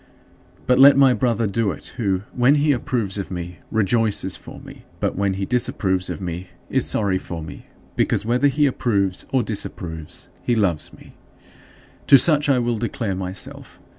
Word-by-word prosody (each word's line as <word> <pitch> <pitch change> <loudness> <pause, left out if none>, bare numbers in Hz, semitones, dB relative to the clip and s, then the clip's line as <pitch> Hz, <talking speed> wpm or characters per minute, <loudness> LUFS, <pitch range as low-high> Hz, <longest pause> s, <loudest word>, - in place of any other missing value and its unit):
" - - -30
But 125 0 +3
let 140 +1 +8
my 135 -2 +6
brother 115 -1 0
do 105 +1 0
it - - -5
who, 95 -5 -1
when 125 +4 +4
he 150 0 +2
approves 115 -7 -1
of 100 - -5
me, 90 -1 -6
rejoices 110 -3 +1
for - - -11
me, - - -13 0.2
but - - -1
when 100 0 0
he 95 0 -3
disapproves 95 -6 0
of - - -4
me 90 0 -5 0.2
is - - +2
sorry 100 -3 +1
for 85 -3 -7
me; 80 - -10 0.3
because - - 0
whether 125 +5 +2
he 145 +2 +2
approves 100 -8 0
or 130 -2 +2
disapproves, 80 -7 -5
he 120 - 0
loves 95 -8 0
me. - - -16 0.9
To 140 - +9
such 150 +1 +4
I 135 - +4
will 120 -2 -1
declare 115 -3 -2
myself. 95 0 -6
110 Hz, 175 wpm, -21 LUFS, 95-125 Hz, 0.9 s, To